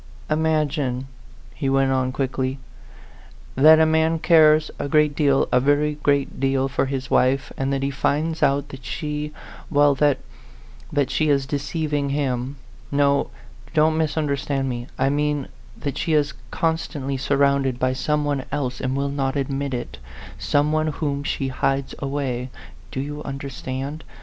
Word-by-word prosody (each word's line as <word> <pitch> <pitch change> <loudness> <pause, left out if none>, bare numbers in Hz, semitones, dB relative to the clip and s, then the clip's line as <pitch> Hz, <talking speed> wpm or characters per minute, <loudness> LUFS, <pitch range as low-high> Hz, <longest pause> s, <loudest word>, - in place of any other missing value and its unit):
"Imagine," 150 -4 0 0.5
he 135 -3 -2
went 135 0 +3
on 130 -1 +1
quickly, 130 0 -2 1.0
"that 155 +3 +7
a 160 - +6
man 160 +1 +2
cares 155 -2 +5
a 140 - -3
great 150 0 +3
deal 140 -3 +3
a 125 - +5
very 145 +3 +2
great 140 -1 +1
deal 135 0 +1
for 135 0 0
his 135 -1 -4
wife, 130 +2 +2
and 135 0 -1
that 135 0 -1
he 140 - 0
finds 155 +3 0
out 140 0 +2
that 135 -2 -10
she 150 +3 -4 0.4
well, 145 -1 +4
that 145 0 +3 0.7
that 140 -3 +1
she 155 -1 +1
is 140 -2 +2
deceiving 145 +1 -2
him. 135 -2 -1 0.4
No 140 0 +2 0.5
don't 155 +1 +4
misunderstand 145 -3 0
me 120 -1 -4
I 135 - +2
mean 145 -1 0 0.3
that 140 - -4
she 160 - 0
is 150 -1 +2 0.2
constantly 160 -4 -1
surrounded 140 -1 +2
by 130 +1 +1
some 150 +3 0
one 140 -2 -1
else 130 -4 -2
and 130 +1 -1
will 140 0 0
not 135 -1 -1
admit 140 -1 -2
it 120 - -6 0.4
some 145 +10 +2
one 155 0 +1
whom 145 -2 -2
she 135 -1 -2
hides 135 +1 -1
away. 135 -3 -2 0.4
Do 130 - -3
you 145 +1 -5
understand? 135 +1 -5
140 Hz, 155 wpm, -23 LUFS, 135-150 Hz, 1.0 s, that